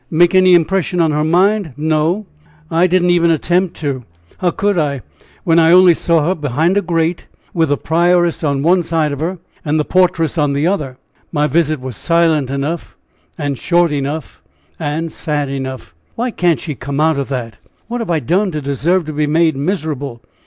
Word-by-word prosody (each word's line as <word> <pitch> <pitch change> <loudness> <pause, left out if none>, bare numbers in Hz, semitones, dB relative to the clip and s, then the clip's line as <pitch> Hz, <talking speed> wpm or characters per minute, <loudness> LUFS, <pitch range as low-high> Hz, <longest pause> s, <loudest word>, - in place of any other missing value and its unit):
"'Make 175 +3 +3
any 185 -1 +6
impression 180 +1 0
on 165 -2 +3
her 150 0 0
mind!' 185 +1 +2
No! 160 +6 0 0.5
I 165 +2 +3
I - - +3
did 185 0 +2
not 175 - +3
even 170 -1 +3
attempt 175 +3 +1
to. 140 -4 -3 0.4
How 180 - +1
could 200 +4 0
I, 145 -5 -1 0.4
when 165 -1 +3
I 165 0 +5
only 180 0 +7
saw 165 -2 +1
her 180 - +2
behind 155 +3 0
a 205 - +3
grate, 165 -1 -1 0.3
with 165 -3 +1
the 145 - +1
prioress 175 +1 +1
on 140 -2 0
one 175 +3 +3
side 160 -2 -1
of 140 - -5
her 175 +4 -2 0.3
and 155 0 0
the 150 - 0
portress 175 -3 +1
on 145 -1 +1
the 140 +2 0
other? 150 -9 -1 0.3
My 150 -2 +1
visit 155 0 +1
was 130 -4 -7
silent 165 -5 +1
enough, 140 +5 -4 0.4
and 145 -4 -3
short 175 -2 +2
enough, 145 +2 -4 0.4
and 160 +3 -3
sad 145 -3 -2
enough. 130 -9 -6 0.2
Why 245 +2 -2
can't 175 -6 +1
she 155 - -5
come 140 +3 -5
out 155 -2 +2
of 140 - -4
that? 120 -5 -4 0.3
What 240 +1 -3
have 225 - -5
I 165 -3 +1
done 185 - +1
to 155 - -2
deserve 155 +6 0
to 155 - -6
be 150 0 0
made 160 0 +2
miserable? 145 -6 -3
160 Hz, 195 wpm, -16 LUFS, 145-175 Hz, 0.5 s, only